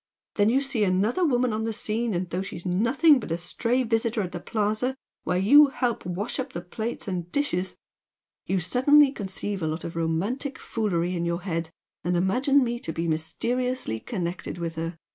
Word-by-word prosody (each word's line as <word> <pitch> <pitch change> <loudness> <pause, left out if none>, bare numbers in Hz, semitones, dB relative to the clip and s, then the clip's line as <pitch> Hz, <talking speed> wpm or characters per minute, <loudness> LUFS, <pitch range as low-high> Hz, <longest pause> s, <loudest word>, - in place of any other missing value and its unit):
Then 205 0 +3
you 260 +4 +3
see 270 -6 0
another 205 - +2
woman 250 -6 +2
on 220 +1 -1
the 225 - -1
scene, 220 0 -1
and 180 +1 -1
though 180 - -1
she's 195 -2 -7
nothing 255 - +4
but 220 - -7
a 165 - +1
stray 230 +9 0
visitor 225 -1 0
at 180 - -5
the 175 - -5
Plaza 215 +6 -1 0.3
where 180 - +1
you 285 +11 +7
help 245 -7 -2
wash 195 +9 -3
up 260 0 -4
the 170 - -4
plates 220 +6 -5
and 175 -2 -3
dishes, 190 -11 -1 0.7
you 190 - +1
suddenly 265 - +5
conceive 200 -3 -4
a 160 - 0
lot 155 +2 -3
of 170 - -6
romantic 195 - -1
foolery 180 -5 -1
in 170 - -1
your 170 +1 -1
head 165 -3 -2 0.3
and 175 +1 +1
imagine 260 - +3
me 240 -1 -2
to 165 - -4
be 165 +1 -2
mysteriously 230 - -1
connected 180 - -4
with 170 -1 -3
her! 165 +1 -4
205 Hz, 190 wpm, -26 LUFS, 175-250 Hz, 0.7 s, you